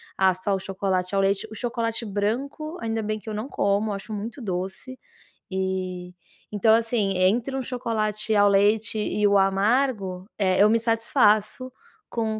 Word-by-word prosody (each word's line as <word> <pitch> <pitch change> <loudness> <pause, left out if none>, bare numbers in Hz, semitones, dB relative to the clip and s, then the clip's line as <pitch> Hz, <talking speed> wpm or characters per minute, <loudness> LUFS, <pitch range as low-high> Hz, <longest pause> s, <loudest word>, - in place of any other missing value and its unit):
"Ah, 190 -1 +3
só 190 +2 -2
o 195 - 0
chocolate 190 -1 -2
ao 195 - +3
leite". 195 0 0
O - - -8
chocolate 230 0 -2
branco, 255 - -3
ainda 225 0 -2
bem 215 0 -3
que 220 - -10
eu - - -4
não 215 +6 -4
como, 200 -1 0
eu - - -2
acho 200 +3 -7
muito 220 +6 -5
doce, 190 +6 -5 0.5
e, 185 -1 -3 0.4
então 215 +2 +4
assim, 225 -3 0
entre 225 +9 +2
um 265 - -2
chocolate 220 -4 -1
ao 205 0 +5
leite 210 +2 +3
e 210 0 0
o 200 0 +4
amargo, 195 -1 +1
eh, 185 -2 +2
eu 210 - +6
me 230 +1 +3
satisfaço 225 +1 +2 0.4
com 220 -2 -2
210 Hz, 170 wpm, -24 LUFS, 195-230 Hz, 0.5 s, eu